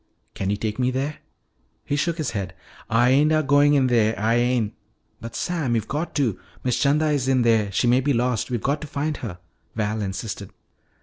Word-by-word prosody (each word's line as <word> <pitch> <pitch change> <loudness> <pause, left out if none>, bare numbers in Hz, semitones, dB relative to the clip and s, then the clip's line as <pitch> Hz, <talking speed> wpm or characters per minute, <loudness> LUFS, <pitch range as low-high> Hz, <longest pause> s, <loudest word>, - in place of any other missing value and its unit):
"Can 95 - -3
you 100 - 0
take 105 +2 -3
me 125 0 +2
there?" 135 +4 -2 0.7
He 145 - -1
shook 160 +4 0
his 155 -4 -2
head. 95 -4 -4 0.3
"Ah 115 +2 +4
ain' 140 +5 +4
a 155 0 +3
goin' 145 +1 +4
in 135 -2 +4
dere, 115 -3 +2
Ah 110 +3 +1
ain'!" 120 -2 +2 0.5
"But, 115 +1 -8
Sam, 155 -8 -1
you've 110 - -1
got 155 +4 -3
to! 125 - 0 0.2
Miss 125 -2 0
'Chanda 150 +2 +2
is 140 -3 0
in 130 -2 +3
there. 110 -3 +2
She 100 - +1
may 125 +2 +4
be 145 +2 +1
lost. 120 -2 0
We've 120 -3 -2
got 145 +2 0
to 155 - -6
find 145 +1 -2
her!" 105 -8 -6 0.4
Val 110 0 -1
insisted. 100 0 -5
125 Hz, 205 wpm, -23 LUFS, 110-145 Hz, 0.7 s, Ah